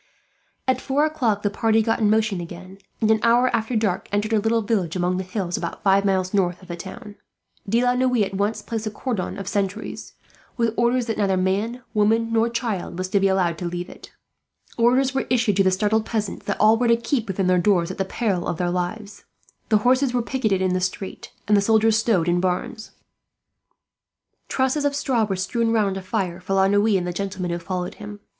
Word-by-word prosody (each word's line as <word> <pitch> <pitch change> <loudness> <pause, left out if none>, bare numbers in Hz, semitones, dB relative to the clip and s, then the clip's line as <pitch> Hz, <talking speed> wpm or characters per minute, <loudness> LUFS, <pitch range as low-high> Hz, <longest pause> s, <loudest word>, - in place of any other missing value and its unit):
At 260 0 +1
four 280 +3 +1
o'clock 235 -10 0
the 205 - +1
party 225 +1 +2
got 225 0 0
in 215 -2 +3
motion 215 -4 +1
again 185 +3 -10 0.2
and, 220 0 +3
an 220 - +3
hour 240 +1 +3
after 225 +2 -2
dark, 205 -4 -1
entered 205 +2 0
a 220 - +4
little 225 +1 +1
village 195 -6 -1
among 180 0 0
the 190 - -2
hills, 185 -2 -3
about 170 - -5
five 195 0 +3
miles 190 -1 0
north 180 -3 +1
of 185 - -16
the 175 - -4
town. 205 +4 -10 0.5
De 230 +4 +2
la 245 0 +3
Noue 250 -3 +2
at 195 - -4
once 205 +3 -1
placed 225 -1 -4
a - - 0
cordon 210 -3 -4
of 195 -2 -6
sentries, 200 +1 -3 0.4
with 230 -2 +1
orders 240 +1 +2
that 225 -2 -3
neither 195 -2 +2
man, 205 +7 -1
woman, 225 +2 +2
nor 225 +1 +3
child 230 -7 -3
was 185 0 -3
to 200 - +2
be 195 - +3
allowed 180 -4 +1
to 180 - -4
leave 175 +1 -5
it. - - -13 0.6
Orders 255 +3 +3
were 270 - -1
issued, 235 -5 +2
to 195 - +5
the 190 - +4
startled 210 +3 +1
peasants, 215 -4 -3
that 200 - -2
all 215 +1 +5
were 245 - +2
to 235 0 +4
keep 235 0 -1
within 195 -1 -1
their 180 0 +3
doors, 175 -3 +2
at - - -9
the - - +2
peril 195 -3 -1
of 170 - -2
their 175 0 -1
lives. 190 +4 -4 0.4
The 215 - +5
horses 255 0 +3
were 240 - +1
picketed 215 -7 0
in 185 -1 +1
the 185 - 0
street, 190 +1 -4 0.2
and 210 - +4
the 200 - +4
soldiers 220 +1 +3
stowed 220 -7 +2
in 175 0 +2
barns; 185 +4 -2 1.6
trusses 265 +3 0
of 285 -1 0
straw 255 -6 +1
were 195 -2 -2
strewn 225 +5 -1
round 210 -4 +1
a 195 - -4
fire 185 -2 -3
for 190 +1 -2
La 190 0 +4
Noue, 205 +1 +3
and 180 - -2
the 175 - -3
gentlemen 185 -1 -3
who 170 - -2
followed 180 +2 -4
him. 205 0 -8
205 Hz, 220 wpm, -23 LUFS, 185-230 Hz, 1.6 s, to